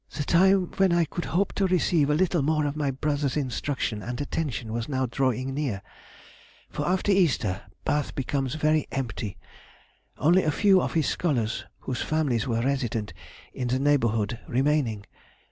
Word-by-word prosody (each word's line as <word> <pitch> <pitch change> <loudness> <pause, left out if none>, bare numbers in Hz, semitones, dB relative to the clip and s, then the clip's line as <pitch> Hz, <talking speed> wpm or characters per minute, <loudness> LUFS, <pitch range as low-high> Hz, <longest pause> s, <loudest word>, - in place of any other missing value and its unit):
"The 145 - 0
time 185 +3 +3
when 195 -2 +4
I 170 -1 +3
could 175 - -5
hope 190 +4 0
to 195 - +1
receive 170 -5 +2
a 150 - +3
little 175 -1 +2
more 155 +1 +1
of 145 0 -2
my 150 -2 0
brother's 145 +1 -1
instruction 130 -5 -2
and 120 +5 -5
attention 140 -6 -3
was 115 +2 -3
now 130 -2 0
drawing 130 +1 -1
near; 130 -9 -2 0.9
for 150 - -3
after 190 +2 +1
Easter, 130 - +2 0.2
Bath 145 0 0
becomes 135 0 -2
very 155 0 +1
empty; 120 -6 -4 0.8
only 175 +5 +4
a 155 - 0
few 190 +4 +4
of - - -2
his 160 -3 +2
scholars 120 -10 -1 0.2
whose 125 - -3
families 140 -8 0
were 115 -1 0
resident 120 - -1 0.4
in 125 - -3
the 125 +1 +1
neighbourhood 115 -6 +1
remaining. 130 -5 +1
140 Hz, 160 wpm, -26 LUFS, 120-155 Hz, 0.9 s, when